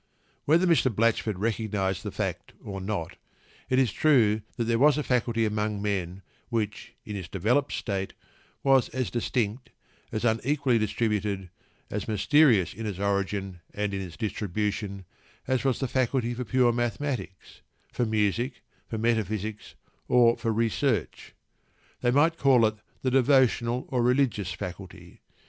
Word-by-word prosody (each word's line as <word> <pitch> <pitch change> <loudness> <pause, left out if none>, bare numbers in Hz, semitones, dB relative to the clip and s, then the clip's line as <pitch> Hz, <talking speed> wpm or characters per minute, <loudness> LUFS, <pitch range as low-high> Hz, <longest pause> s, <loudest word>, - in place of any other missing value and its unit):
Whether 165 +5 +4
Mr. 165 -7 +3
Blatchford 110 -2 +1
recognised 105 -3 -1
the - - -4
fact - - -4
or 95 -1 -6
not, 95 -4 -4 0.5
it 130 - +2
was 130 -5 +3
true 110 -8 +3 0.2
that 120 - 0
there 115 0 +1
was 150 +2 +5
a 150 - 0
faculty 120 -3 +1
among 105 -1 -1
men 95 -2 -3 0.3
which, 110 -3 -3
in 105 - -6
its 95 -4 -5
developed 115 +11 +1
state, 95 -3 -3 0.5
was 135 -3 +4
as 130 0 -3
distinct, 120 0 -2 0.4
as 110 +1 -2
unequally 125 +2 +2
distributed, 105 -3 -1 0.4
as 105 -1 -3
mysterious 110 - +4
in 110 -1 -5
its 100 -4 -4
origin 100 -2 -2
and 105 -1 -1
in 95 - -2
its 90 -3 -8
distribution, 105 -2 -3 0.4
as 130 -2 0
was 135 -3 +1
the 135 - -2
faculty 125 -1 0
for 125 +1 -4
pure 125 +1 +3
mathematics, 120 -4 -4 0.3
for - - 0
music, 110 +3 0 0.2
for 110 - -4
metaphysics, 110 -2 -2 0.3
or 120 -1 +5
for 115 - -2
research. 115 - -1 0.7
They 120 - +2
might 155 +6 +3
call 130 -4 +5
it 110 0 0 0.3
the 130 - +1
devotional 125 -2 +3
or 125 -2 0
religious 120 -6 +1
faculty. 90 -1 -8
110 Hz, 145 wpm, -27 LUFS, 100-125 Hz, 0.7 s, was